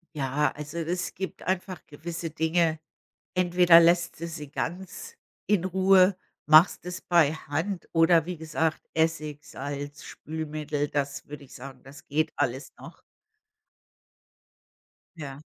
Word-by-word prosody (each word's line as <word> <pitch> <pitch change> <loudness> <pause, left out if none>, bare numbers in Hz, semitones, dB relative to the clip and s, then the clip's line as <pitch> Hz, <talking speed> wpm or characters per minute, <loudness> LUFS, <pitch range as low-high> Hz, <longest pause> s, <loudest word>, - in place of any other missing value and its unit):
Ja, 145 +1 0
also 150 +3 -7
es 170 +2 -2
gibt 190 +1 -6
einfach 185 -1 -3
gewisse 165 +3 -6
Dinge. 160 +1 +1 0.6
Entweder 175 -1 +6
lässt 170 0 +3
du 170 - -4
sie 155 -4 -7
ganz 190 - -5 0.3
in 205 -4 +2
Ruhe, 190 +1 +4 0.3
machst 155 +3 +6
es 180 +1 -5
bei 165 -4 +3
Hand 160 +5 -4
oder 165 -1 +5
wie 180 0 -5
gesagt, 160 0 -2
Essig, 155 -2 -1
Salz, 145 +1 -6
Spülmittel, 155 -1 -4
das 140 -1 -3
würde 145 -1 -9
ich 130 - -17
sagen, 130 0 -10
das 140 +2 -14
geht 155 +2 -1
alles 135 -1 -2
noch. - - -12 2.2
Ja. 140 -2 -8
160 Hz, 125 wpm, -27 LUFS, 145-175 Hz, 2.2 s, Entweder